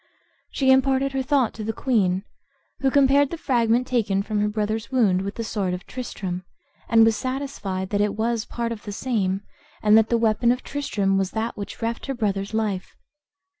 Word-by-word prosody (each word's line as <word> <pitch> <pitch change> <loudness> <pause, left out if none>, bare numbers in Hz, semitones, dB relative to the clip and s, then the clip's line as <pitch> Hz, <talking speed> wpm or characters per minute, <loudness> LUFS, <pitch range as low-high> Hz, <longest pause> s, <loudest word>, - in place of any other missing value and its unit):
She 265 -1 +2
imparted 265 +1 +3
her 270 0 -1
thought 265 -3 +1
to 220 - -6
the 220 - -1
queen, 200 -8 +1 0.6
who 270 - +2
compared 280 0 +4
the 335 - -5
fragment 240 -4 +2
taken 205 -6 0
from 215 0 -2
her 210 - +2
brother's 215 +1 -2
wound 215 -9 +3
with 200 +1 -4
the 230 - -3
sword 195 -5 -1
of 180 - -10
Tristram, 190 -8 -5 0.5
and 225 -1 +6
was 225 -1 +3
satisfied 255 -8 -4
that 205 0 +1
it 210 -1 0
was 225 +1 -1
part 235 -1 -3
of 225 -3 -5
the 205 - -7
same, 200 -5 -1 0.4
and 210 0 +6
that 220 - +1
the 235 - +3
weapon 230 +1 +3
of 250 +1 -2
Tristram 200 -9 0
was 190 -1 0
that 225 +1 -2
which 200 +3 -7
reft 230 +3 -3
her 270 - -2
brother's 200 -4 -1
life. 215 -4 -2
225 Hz, 195 wpm, -24 LUFS, 200-255 Hz, 0.6 s, and